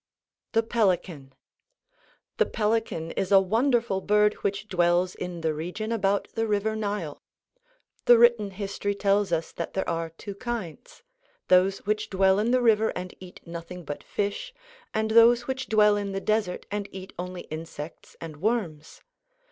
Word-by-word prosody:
THE 225 0 +3
PELICAN 180 - -1 1.0
The - - +3
pelican 215 -7 -1
is 190 0 -2
a 195 - +8
wonderful 230 0 +1
bird 210 +1 +3
which 200 +1 -2
dwells 175 -1 +2
in 180 -2 -6
the 160 -1 0
region 180 +8 -4
about 200 -3 +1
the 225 0 -1
river 215 +1 0
Nile. 205 -8 -3 0.8
The 240 - +8
written 235 -3 +5
history 200 +1 -3
tells 200 -1 +1
us 165 -1 -1
that 170 - -6
there 190 - -1
are 165 -1 -2
two 180 +5 -9
kinds, 240 - -6 0.5
those 185 +2 +4
which 210 +1 -1
dwell 190 0 +3
in 220 +3 +1
the 250 0 +3
river 220 -1 +4
and 180 0 -5
eat 185 -1 -12
nothing 170 +1 -8
but 145 0 -6
fish, 205 - -3 0.4
and 220 0 -1
those 235 +1 +6
which 265 0 -3
dwell 210 -1 +5
in 200 -1 -3
the 195 - -1
desert 210 -2 -1
and 205 -1 -3
eat 190 0 -9
only 180 0 -5
insects 155 0 -8
and 160 -3 -8
worms. 175 -6 -2
200 Hz, 155 wpm, -26 LUFS, 180-220 Hz, 1.0 s, a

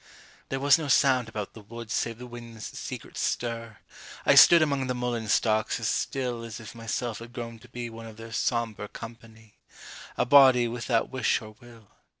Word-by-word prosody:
There 135 - -2
was 140 +2 +5
no 155 - -4
sound 130 -4 +3
about 105 -3 -5
the 110 - -11
wood 115 +2 -9
Save 115 0 -1
the 125 - -9
wind's 120 -2 -9
secret - - -7
stir. 115 -2 -3 0.5
I - - +6
stood 170 -2 +9
Among 140 -3 0
the 125 - -1
mullein 120 -2 -2
stalks 110 +1 +1
as - - -2
still 125 -3 -2
As 115 -1 -7
if 110 -2 -10
myself 115 -1 -4
had 120 +1 -11
grown 115 -2 -7
to 125 - -17
be 120 0 -5
One 115 0 -9
of 110 -1 -12
their 115 0 -10
sombre 115 -2 -1
company, 115 -1 -12 0.6
A - - +2
body 130 -2 +7
without 115 0 -1
wish 130 -3 +1
or 110 - -10
will. 115 -3 -16
115 Hz, 185 wpm, -27 LUFS, 115-125 Hz, 0.6 s, stood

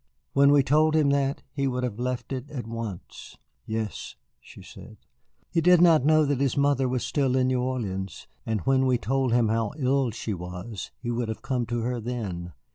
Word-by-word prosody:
When 140 0 +5
we 145 -1 +5
told 155 +3 +3
him 150 -3 +3
that, 140 0 0
he 140 -1 -1
would 125 -1 -2
have 120 -3 -3
left 125 +1 -3
it 130 +2 -5
at 130 -7 -5
once." 115 -5 -7 0.3
"Yes," 110 - -4 0.2
she - - -14
said. - - -13 0.5
"He 165 - +2
did 180 +1 +6
not 165 -5 +6
know 155 +1 +4
that 140 -2 0
his 140 0 +1
mother 140 -2 +2
was 125 -1 -1
still 135 -3 0
in 130 -1 +2
New 130 -1 +1
Orleans. 100 -7 -4 0.2
And 110 -3 -2
when 130 +2 +2
we 125 -1 +3
told 130 +1 0
him 120 -2 +3
how 115 -1 0
ill 135 -2 +1
she 110 -1 -4
was 90 +3 -7
he 120 - -4
would 120 -1 -2
have 110 - -5
come 130 -4 -1
to 120 0 -2
her 120 +1 -2
then. 100 -8 -5
125 Hz, 200 wpm, -26 LUFS, 115-140 Hz, 0.5 s, did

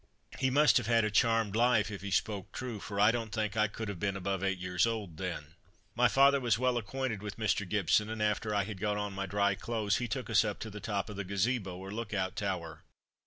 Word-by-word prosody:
He 130 - +2
must 140 -2 +5
have 120 -4 -1
had 115 -1 +4
a 110 - -1
charmed 115 -1 +2
life, 115 -3 +3
if 100 - -6
he 100 - -5
spoke 100 -1 -1
true, 120 -4 -5
for 100 0 -5
I 105 +2 +6
don't 115 -2 -3
think 110 -1 -2
I 105 0 +3
could 110 +1 -6
have 100 -4 -5
been 100 0 -1
above 95 0 -2
eight 95 0 0
years 90 +3 +1
old 105 -8 -4
then. 80 -4 -5 0.4
My 120 +2 +4
father 140 +5 +5
was 120 -4 +2
well 125 0 +1
acquainted 115 -1 -3
with 105 -1 -6
Mr. 105 -3 0
Gibson, 105 +2 +2
and 110 0 -4
after 105 0 0
I 100 - +2
had 100 -1 -7
got 105 -1 0
on 105 -1 -3
my 100 0 -3
dry 100 +1 +2
clothes, 105 0 -1
he 125 - -2
took 125 +2 -3
us 115 -1 +4
up 105 -2 -3
to 110 - -5
the 105 - -7
top 100 -1 -2
of 100 - -8
the 100 - -2
Gazebo, 100 0 -1
or 95 +1 -8
look 105 0 -4
out 95 -1 -1
tower. 85 -6 -3
105 Hz, 250 wpm, -31 LUFS, 100-115 Hz, 0.4 s, I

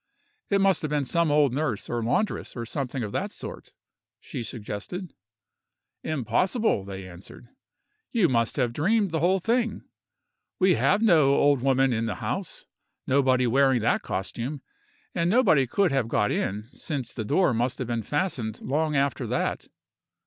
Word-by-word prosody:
"It 200 - +3
must 195 -1 +3
have 155 - -2
been 145 -2 0
some 170 +3 +1
old 145 -3 +3
nurse, 135 -7 -2
or 120 -1 -2
laundress, 120 - -1
or 120 -2 -4
something 130 0 -3
of 105 - -4
that - - -2
sort," - - -8 0.5
she - - -6
suggested. 115 - -6 0.9
"Impossible!" 155 - 0
they 95 -1 -7
answered; 90 +6 -12 0.6
"you 220 -7 +3
must 115 -4 +1
have 125 -4 0
dreamed 200 - +1
the 160 - 0
whole 180 +5 +3
thing; 230 +5 0 0.7
we 185 0 +4
have 205 +5 +2
no 155 -10 +5
old 145 -3 +3
woman 135 -1 +3
in 115 0 -1
the 105 - -2
house; - - -5 0.4
nobody 130 -2 +3
wearing 130 0 +3
that 110 - +1
costume; 125 +9 -4 0.5
and 170 0 +1
nobody 180 - +4
could 195 +6 +2
have 135 -4 +1
got 105 -2 +1
in, 105 +2 -2
since 135 -3 -5
the 110 - -4
door 145 - +2
must 120 +2 0
have 130 - -4
been 120 -1 -1
fastened 125 - -2
long 150 +3 -1
after 140 -1 0
that!" - - -2
135 Hz, 160 wpm, -26 LUFS, 115-170 Hz, 0.9 s, no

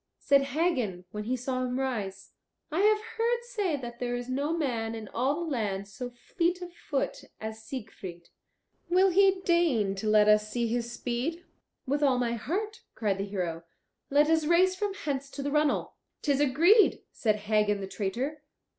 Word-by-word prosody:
Said 275 -1 +3
Hagen, 245 - 0
when 210 0 -5
he 255 +3 0
saw 255 +1 -2
him 250 +1 -2
rise, 205 -7 -3 0.4
"I 315 - 0
have 425 +1 +5 0.2
heard 475 +1 +1
say 415 -9 -1
that 240 -2 -8
there 245 -1 -1
is 245 +1 -5
no 280 +4 -1
man 230 -7 -1
in 220 -1 -7
all 265 +5 0
the 325 - -4
land 200 -6 -2
so 205 +5 -6
fleet 340 +9 -1
of 350 -1 -9
foot 285 -5 -3
as 220 0 -6
Siegfried. 205 -8 -8 0.6
Will 370 +2 +5
he 385 +1 +4
deign 325 - +2
to 195 +2 -4
let 210 -1 +5
us 210 0 +4
see 235 +1 -1
his 235 +1 -1
speed?" 255 +9 -3 0.4
"With 285 +2 0
all 270 -3 +4
my 240 -1 0
heart," 390 - -3
cried 200 -3 0
the 195 - -1
hero. 175 -5 -3 0.5
"Let 290 +2 +4
us 320 -1 +3
race 365 +3 +4
from 400 +1 -2
hence 280 -7 -3
to 280 - -6
the 285 - -2
runnel." 300 0 +1 0.3
"'Tis 285 -2 +2
agreed," 335 - +5
said 215 -3 +1
Hagen 210 -1 +1
the 195 - -4
traitor. 245 +10 -3
255 Hz, 180 wpm, -29 LUFS, 215-325 Hz, 0.6 s, have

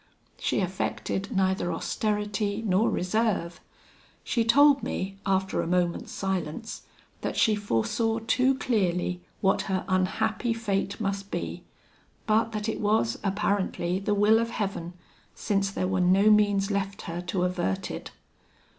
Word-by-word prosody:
She - - 0
affected 190 +1 -2
neither 190 -3 +1
austerity 210 +3 -1
nor 200 +2 +3
reserve. 185 -3 0 0.6
She 235 - +1
told 280 +4 +6
me, 195 +1 -4
after 190 0 +1
a - - -3
moment's 175 -1 0
silence, 190 +1 -3 0.4
that - - -3
she 220 - +4
foresaw 210 - 0
too 255 +4 +3
clearly, 180 -7 0 0.2
what 195 -1 +3
her 185 -2 -1
unhappy 220 +5 0
fate 200 -3 -2
must 200 -1 -2
be; - - -4 0.6
but 225 +1 +2
that 210 0 -3
it 220 - -2
was, 205 - +1
apparently, 195 -3 0
the 205 +1 0
will 210 +2 +5
of 230 0 -1
Heaven, 195 -6 -3 0.4
since 195 -2 0
there 185 -1 -2
were 185 0 0
no 195 +4 +5
means 205 -1 +3
left 200 0 -2
her 170 +1 -4
to 180 +1 0
avert 180 - -1
it. - - -6
200 Hz, 135 wpm, -27 LUFS, 185-215 Hz, 0.6 s, told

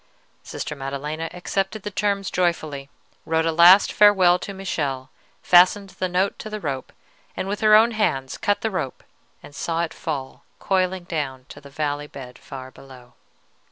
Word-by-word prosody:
Sister - - -6
Maddelena 145 +4 -5
accepted 195 +3 -3
the 205 - -5
terms 200 -1 -1
joyfully, 155 -6 -1 0.3
wrote 160 0 0
a 165 - +1
last 175 +4 +7
farewell 190 -4 +5
to 200 - -6
Michele, 145 -9 -4 0.3
fastened 190 +3 +5
the 185 - -3
note 185 +3 0
to 215 - -7
the 215 0 -5
rope, 140 -7 -4 0.5
and - - -3
with 205 +1 -3
her 215 -1 +6
own 225 +2 +6
hands 135 - -1
cut 205 - 0
the 220 - -1
rope 135 -9 -4 0.4
and - - -13
saw 165 +3 -2
it 165 - -4
fall 140 -4 -5
coiling 185 -1 0
down 140 -7 -4
to 145 - -11
the 140 - -13
valley 145 0 -3
bed 125 -4 -11
far 130 -1 -9
below. 125 -3 -15
170 Hz, 165 wpm, -23 LUFS, 140-195 Hz, 0.5 s, last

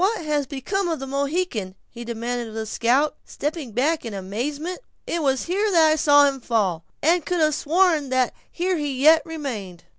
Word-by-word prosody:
"What 395 -4 +1
has 295 -2 0
become 350 +9 -2
of 325 - -2
the 270 - -5
Mohican?" 275 - -2
he 240 0 -9
demanded 235 +1 -3
of 220 - -10
the 220 0 -3
scout, 255 +7 +1
stepping 295 -4 -4
back 290 +8 0
in 225 -3 -6
amazement; 280 - -4 0.3
"it 340 - -2
was 270 -3 +1
here 400 +5 0
that 325 -5 +5
I - - +3
saw 290 -1 +5
him 275 -1 0
fall, 195 -9 0 0.2
and 335 +2 +3
could 355 +3 -1
have 310 -1 +3
sworn 320 -1 +2
that 255 -1 +1 0.2
here 360 +1 -1
he 285 -4 -3
yet 315 +3 +6
remained." 235 - -6
285 Hz, 190 wpm, -23 LUFS, 240-325 Hz, 0.3 s, yet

